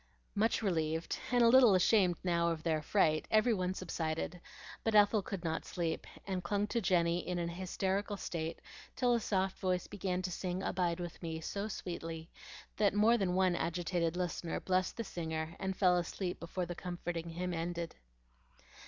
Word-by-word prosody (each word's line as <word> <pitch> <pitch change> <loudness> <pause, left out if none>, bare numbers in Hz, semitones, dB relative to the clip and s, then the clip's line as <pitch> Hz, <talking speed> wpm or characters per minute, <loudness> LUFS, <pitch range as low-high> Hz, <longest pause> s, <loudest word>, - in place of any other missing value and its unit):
Much 220 +2 +1
relieved, 160 -4 0
and 245 -1 +5
a - - +7
little 240 -4 +7
ashamed 185 -1 +4
now 170 -2 +2
of 160 -1 -3
their 160 -2 +1
fright, 155 -3 +2
every 220 +2 +4
one 185 -3 0
subsided; 170 -1 -3 0.4
but 225 -1 +1
Ethel 205 0 +6
could 190 -2 -5
not 160 -1 -1
sleep, 170 -2 -3 0.2
and 185 -2 -2
clung 200 +3 0
to 235 +2 -1
Jenny 175 -3 +2
in 180 0 -3
an 170 -1 -1
hysterical 190 +3 -2
state 165 -3 -4 0.4
till 245 -1 +3
a 235 - +3
soft 190 -3 0
voice 185 -2 0
began 185 -3 -2
to 185 - -2
sing 180 +1 -3
"Abide 175 -2 0
with 175 -1 -6
me" 165 -2 -3
so 200 +6 -3
sweetly 165 -4 -5 0.5
that 205 -1 +3
more 215 +3 +5
than 190 -5 +1
one 185 -1 +3
agitated 170 0 -1
listener 175 -2 -2
blessed 185 0 0
the 230 - -1
singer 160 -4 -4
and 190 -1 -2
fell 180 -2 +5
asleep 175 +1 -2
before 175 +2 -3
the 175 - -4
comforting 175 -2 -4
hymn 180 +2 -3
ended. 170 0 -3
180 Hz, 175 wpm, -34 LUFS, 170-195 Hz, 0.5 s, a